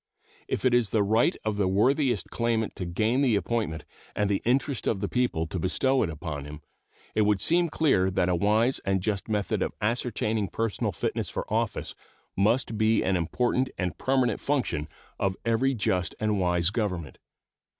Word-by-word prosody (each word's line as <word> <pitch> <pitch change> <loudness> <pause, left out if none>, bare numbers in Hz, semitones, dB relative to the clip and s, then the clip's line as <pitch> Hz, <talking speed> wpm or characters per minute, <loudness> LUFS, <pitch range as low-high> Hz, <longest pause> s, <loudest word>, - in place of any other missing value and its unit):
If - - -2
it 125 - +4
is 120 -4 +3
the 105 -1 +2
right 110 +4 +2
of 105 -1 -1
the 100 -2 +2
worthiest 120 +4 +1
claimant 115 -2 -1
to 90 - -3
gain 110 +9 +1
the 125 -6 +3
appointment 100 -7 -2 0.3
and 105 -1 +1
the 100 - 0
interest 130 +2 0
of 105 - +1
the 100 - -1
people 125 -10 0
to 85 +2 -4
bestow 130 +10 +1
it 95 - 0
upon 75 -2 -5
him, 75 +1 -9 0.5
it 110 - +2
would 105 -1 +3
seem 170 - +2
clear 135 -13 +2
that 90 -1 +1
a 90 - +2
wise 105 +8 +2
and 95 0 0
just 100 +2 -2
method 105 -2 -1
of - - -2
ascertaining 110 -2 -1
personal 115 +2 -2
fitness - - -3
for - - -4
office - - -1 0.4
must 110 +2 +1
be 110 +1 +3
an 95 - +1
important 125 +9 0
and 90 -3 -3
permanent 130 -4 +1
function 130 - -1 0.3
of 95 -1 0
every 120 +4 +2
just 90 -5 0
and 105 -2 0
wise 90 -1 +2
government. 90 - -3
105 Hz, 180 wpm, -27 LUFS, 95-120 Hz, 0.5 s, it